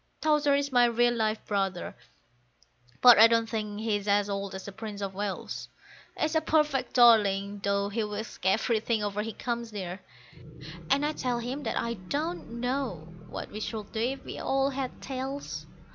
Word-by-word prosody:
Towser 300 -2 +3
is 280 0 0
my 245 -1 +5
real 240 +1 +3
live 220 -2 -1
brother, 195 -3 -2 1.1
but 245 -3 +9
I 225 - +10
don't 230 0 +2
think 210 -1 -4
he's 210 -2 -1
as 205 0 +2
old 200 -1 -3
as 190 - -7
the 200 - -6
Prince 210 0 -7
of 195 -1 -4
Wales; 200 0 -4 0.5
He's 310 0 +1
a 315 - +3
perfect 300 -4 +1
darling, 205 -4 +5
though 200 0 +1
he 220 +2 -1
whisks 210 +1 -5
everything 220 +3 +1
over 205 0 -1
he 225 +1 -4
comes 235 0 -4
near, 190 -2 -5 0.9
and 280 +1 +3
I 300 - +1
tell 250 -4 -1
him 250 +4 -4
I 235 +1 -1 0.2
don't 295 -5 -3
know 245 - -3 0.2
what - - -6
we 210 - -6
should 215 -1 -5
do 220 - -4
if 260 +4 -2
we - - -6
all 270 +1 +1
had 265 -1 -5
tails. 270 +1 -5
225 Hz, 175 wpm, -28 LUFS, 205-260 Hz, 1.1 s, I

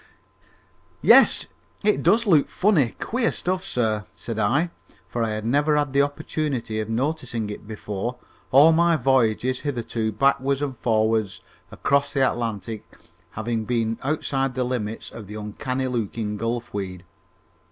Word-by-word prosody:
"Yes, - - +6 0.4
it 210 0 +2
does 220 +7 +3
look 160 -9 +4
funny, 180 - +2
queer 235 0 0
stuff, 185 +1 -2
sir," 110 -3 -1
said 115 -2 -5
I, 140 +12 +1 0.4
for 120 - -3
I 115 - 0
had 110 0 -3
never 145 +5 +2
had 145 -2 0
the 140 - +4
opportunity 145 -5 -2
of 110 0 -3
noticing 120 -3 -2
it 105 - -9
before, 110 +2 -4 0.3
all 145 +5 +7
my 170 +1 +4
voyages 130 -2 +2
hitherto 120 -5 -2
backwards 135 +4 +1
and 135 -3 -3
forwards 110 -4 +1 0.3
across 140 0 0
the 135 -2 +3
Atlantic 115 -2 -3 0.5
having 110 0 -2
been 115 -2 -1
outside 135 -2 -1
the 130 - 0
limits 115 -3 -3
of 110 -4 -9
the 105 - -8
uncanny 125 +5 -3
looking 115 -3 -2
gulf 115 +3 -3
weed. 95 -3 -5
120 Hz, 140 wpm, -24 LUFS, 110-140 Hz, 0.5 s, all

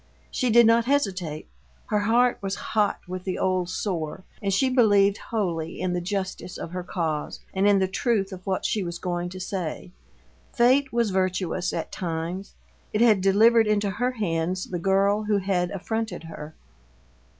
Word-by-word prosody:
She 250 - 0
did 235 +1 +7
not 230 +1 +4
hesitate 185 - -1 0.4
her 210 - 0
heart 235 +4 +3
was 195 0 -2 0.2
hot 210 -2 +1
with 185 0 -5
the 185 -1 -3
old 185 -2 0
sore, 180 -3 -3 0.2
and 200 - -1
she 195 +8 +3
believed 205 -6 +4
wholly 170 -7 -2
in 180 -1 -1
the 180 - -1
justice 190 -1 -4
of 170 - -6
her 180 0 -4
cause 160 -4 -3
and 195 +1 +2
in 205 -1 +5
the 190 -1 +2
truth 205 0 0
of 185 0 -9
what 190 -1 -1
she 210 - 0
was 170 -1 -4
going 175 -1 -3
to 185 +1 -8
say. 180 -2 -4 0.6
Fate 265 +2 +3
was 235 -3 +1
virtuous 185 -1 0
at - - -4
times; 170 +2 -4 0.4
it 210 - 0
had 220 -5 +5
delivered 220 +4 +5
into 205 -1 +1
her 245 +6 -1
hands 180 -4 -1
the 175 - -2
girl 195 +3 +2
who 210 -1 +2
had 185 -2 0
affronted 220 0 -3
her. 155 -1 -9
195 Hz, 170 wpm, -25 LUFS, 180-215 Hz, 0.6 s, did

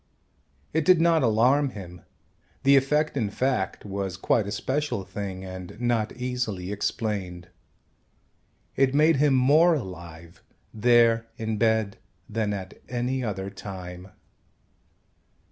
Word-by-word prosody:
It 160 0 +2
did 180 +1 +5
not 165 -1 +4
alarm 130 +5 +3
him. 90 -2 -9 0.6
The 140 +1 +6
effect 150 +3 +2
in 115 -7 0
fact 115 -4 -1
was 95 -2 -4
quite 100 +2 +1
a - - -4
special 130 0 -2
thing 95 -1 -6
and 95 +2 -9
not 120 -3 0
easily 125 -7 -3
explained. 100 -4 -3 1.3
It 135 0 +2
made 155 +1 +4
him 145 -1 +3
more 155 +7 +5
alive, 85 - -8 0.3
there 115 0 +4
in 110 -1 -2
bed, 110 -2 +1 0.3
than 110 -1 -1
at 95 -2 -6
any 125 +1 -1
other 100 -3 -4
time. 90 -2 -8
110 Hz, 120 wpm, -26 LUFS, 95-130 Hz, 1.3 s, The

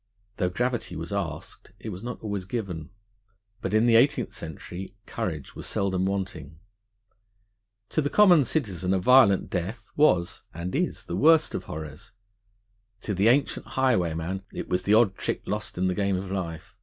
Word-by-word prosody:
Though 90 -3 +1
gravity 120 -1 -2
was 85 +4 -5
asked, 90 -1 -5
it 110 - -7
was 95 -2 -7
not 120 0 -6
always 100 -3 -3
given; 95 -8 -4 0.7
but - - -2
in 110 +2 +4
the 115 -1 +6
Eighteenth 140 +5 +2
Century 90 +4 -8
courage 75 -6 -4
was - - -7
seldom 95 -1 0
wanting. 90 -7 -4 1.3
To 155 - +1
the 145 - -1
common 180 -6 +6
citizen 95 - -1
a - - +1
violent 100 -2 +5
death 100 +5 -4
was 90 - +3
(and 85 +2 -4
is) 175 +5 -1
the - - -4
worst 160 0 +4
of - - -4
horrors; 80 +6 -8 0.9
to 105 - -3
the 100 +3 +2
ancient 130 +4 +2
highwayman 95 -8 +1
it - - -6
was 90 0 0
the 100 +3 +3
odd 110 -3 +5
trick - - -3
lost - - -4
in 95 +1 +1
the 90 - +1
game 100 0 0
of 95 0 -5
life. 85 -3 -5
95 Hz, 170 wpm, -26 LUFS, 90-120 Hz, 1.3 s, the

